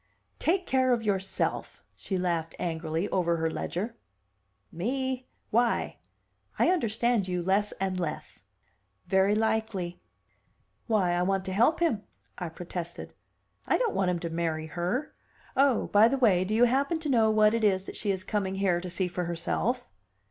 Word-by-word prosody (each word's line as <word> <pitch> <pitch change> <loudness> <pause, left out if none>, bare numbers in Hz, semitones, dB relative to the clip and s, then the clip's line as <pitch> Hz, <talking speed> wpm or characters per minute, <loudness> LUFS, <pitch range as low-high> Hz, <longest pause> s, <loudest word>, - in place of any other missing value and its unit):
"Take 360 +3 +1
care 260 -1 +3
of 235 -2 -1
yourself!" 195 -2 -2
she 190 - -3
laughed 170 -3 -1
angrily 165 +1 -2
over 170 -2 +1
her 160 0 0
ledger. 210 +9 -4 0.7
"Me? 260 +7 -2 0.2
Why? 235 +1 +1 0.6
I - - +4
understand 235 - +1
you 180 -1 -1
less 200 +3 +2
and 190 -1 -2
less!" 155 - -5 0.6
"Very 190 +2 +3
likely." 220 -5 -1 0.9
"Why, 205 -6 +2
I 175 0 +1
want 190 +1 0
to 190 - -3
help 240 - +3
him!" 300 -12 +2 0.4
I 175 -3 -3
protested. 170 +1 -7 0.5
"I - - +3
don't 475 -4 0
want 190 -2 +1
him 180 - +1
to 170 - -4
marry 165 -1 -1
her. 180 - -2 0.4
Oh, 270 -2 +3
by 210 +2 +6
the 275 +3 0
way 195 -8 +4
do 215 +3 -1
you 235 - +5
happen 275 +6 +2
to 315 - -3
know 230 -5 +4
what 215 0 +4
it 230 -1 0
is 190 -2 +2
that - - -8
she 205 - -1
is 190 -1 -3
coming 195 -2 -1
here 190 -3 +1
to 180 - -6
see 180 +1 -1
for 180 0 -3
herself?" 195 +9 -1
195 Hz, 165 wpm, -28 LUFS, 175-235 Hz, 0.9 s, by